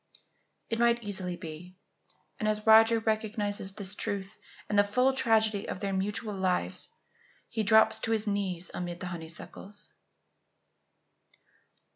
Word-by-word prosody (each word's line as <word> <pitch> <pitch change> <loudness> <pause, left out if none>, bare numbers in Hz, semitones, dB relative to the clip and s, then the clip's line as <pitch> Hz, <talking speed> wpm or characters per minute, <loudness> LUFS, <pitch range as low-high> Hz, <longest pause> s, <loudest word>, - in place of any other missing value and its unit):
It 230 - 0
might 235 0 +3
easily 190 -3 -4
be; 175 +1 -9 0.6
and 215 - -1
as 215 0 -2
Roger 225 +1 +7
recognizes 215 -3 -2
this 200 -1 -1
truth 200 0 -4 0.3
and 205 -1 +2
the - - +7
full 250 +6 +2
tragedy 220 -5 +2
of - - -4
their 200 -1 -2
mutual 205 +3 -2
lives, 180 - 0 0.6
he 225 - -2
drops 220 +1 +5
to 225 - -2
his 220 -1 +1
knees 190 -4 -2
amid 175 -1 -5
the - - -5
honeysuckles. 170 +5 -8
205 Hz, 130 wpm, -29 LUFS, 190-220 Hz, 0.6 s, Roger